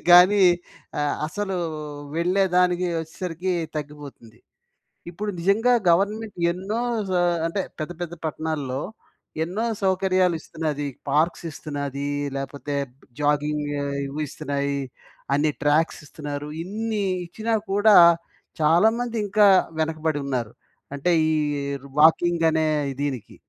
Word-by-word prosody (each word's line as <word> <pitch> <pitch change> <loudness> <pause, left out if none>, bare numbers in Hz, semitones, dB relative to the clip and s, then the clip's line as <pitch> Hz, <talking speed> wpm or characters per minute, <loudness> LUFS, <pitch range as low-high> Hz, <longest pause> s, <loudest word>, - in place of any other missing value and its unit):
కానీ 185 +3 +8 0.6
ఆహ్, 145 -1 +1
అసలు 195 +3 -3 0.6
వెళ్ళేదానికి, 180 0 +2
వచ్చేసరికి 175 +2 -4 0.2
తగ్గిపోతుంది. 145 -6 -8 0.7
ఇప్పుడు 205 +5 -4
నిజంగా 215 +8 +3 0.2
గవర్నమెంట్ 205 +4 +1
ఎన్నో 195 +6 -3 0.7
అంటే 165 +4 -1 0.2
పెద్ద, 155 +3 -4
పెద్ద 175 -1 -4
పట్టణాల్లో 150 -4 -3 0.6
ఎన్నో 185 +7 -3 0.2
సౌకర్యాలు 185 -2 +2
ఇస్తున్నది. 150 -3 -3 0.2
పార్క్స్ 160 +5 +1
ఇస్తున్నది. 145 -2 -4 0.3
లేపోతే 140 +1 -4 0.5
జాగింగ్ 150 0 +1 0.4
ఇవి 145 +3 -5
ఇస్తున్నాయి. 140 +1 -2 0.5
అన్ని 150 +2 +2
ట్రాక్స్ 150 +3 +2
ఇస్తున్నారు. 145 0 -6 0.2
ఇన్ని 215 +2 -2 0.2
ఇచ్చినా 220 +6 -3 0.2
కూడా 205 +1 +5 0.7
చాలామంది 220 +10 +3
ఇంకా 205 +1 +5 0.3
వెనకబడి 155 -1 -1
ఉన్నారు. 125 -5 -2 0.4
అంటే 140 +5 0 0.2
ఈ - - +2 0.7
వాకింగ్ 165 +2 +4
అనే 160 0 +1 0.4
దీనికి. 135 -6 -4
165 Hz, 95 wpm, -24 LUFS, 145-190 Hz, 0.7 s, కానీ